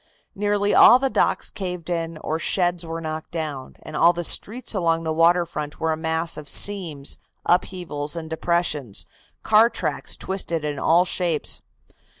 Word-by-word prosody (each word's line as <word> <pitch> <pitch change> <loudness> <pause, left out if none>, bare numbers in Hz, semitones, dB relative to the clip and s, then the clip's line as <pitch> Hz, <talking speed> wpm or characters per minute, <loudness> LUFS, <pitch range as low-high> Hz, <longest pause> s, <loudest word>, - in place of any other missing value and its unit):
Nearly 205 0 0
all 245 - +8
the 265 0 -1
docks - - +1
caved 180 -3 -5
in 165 -2 -3
or 160 +1 -2
sheds 175 -1 0
were 165 0 -5
knocked 155 0 -5
down, 150 -5 -5
and 155 - -9
all 170 +3 +5
the 175 0 -4
streets 230 +9 +1
along 165 -4 0
the 160 -1 -1
water 170 +2 +4
front 150 -3 -6
were 160 0 0
a - - +1
mass 160 +1 -2
of 150 -1 -6
seams, 170 -9 +1 0.3
upheavals 170 -4 -1
and 165 -1 -5
depressions, 160 - -1 0.4
car 220 +2 +5
tracks - - -3
twisted 170 -5 -2
in 145 -2 -3
all 170 +5 +4
shapes. 175 -4 -1
165 Hz, 160 wpm, -23 LUFS, 155-180 Hz, 0.4 s, all